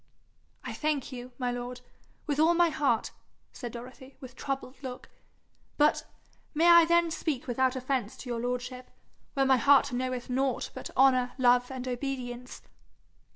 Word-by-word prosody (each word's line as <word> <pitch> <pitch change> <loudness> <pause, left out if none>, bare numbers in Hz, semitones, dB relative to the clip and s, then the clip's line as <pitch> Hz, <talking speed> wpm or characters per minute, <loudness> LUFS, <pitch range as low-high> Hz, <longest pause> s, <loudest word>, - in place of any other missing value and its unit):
'I - - -5
thank 300 -3 -2
you, 250 0 -8
my 250 -2 -1
lord, 245 0 -5 0.4
with 295 -2 -1
all 330 +2 +5
my 345 0 +4
heart,' 280 -7 0 0.4
said 240 -2 -6
Dorothy, 255 +3 -11
with 260 -2 -11
troubled 270 -1 -5
look, 255 -2 -8 0.7
'but 295 0 +3 0.5
may 330 +3 +4
I 340 -1 +8
then 340 0 +3
speak 300 -5 -2
without 260 +1 +1
offence 255 -4 -2
to 255 - -9
your 235 - -2
lordship, 250 +1 -4 0.5
where 270 -1 +3
my 265 -1 +5
heart 275 +1 +4
knoweth 255 0 -2
nought 260 0 -1
but - - -7
honour, 255 -1 +4
love, 245 -1 +4
and 260 -1 -6
obedience?' 250 -1 -5
255 Hz, 155 wpm, -29 LUFS, 245-275 Hz, 0.7 s, I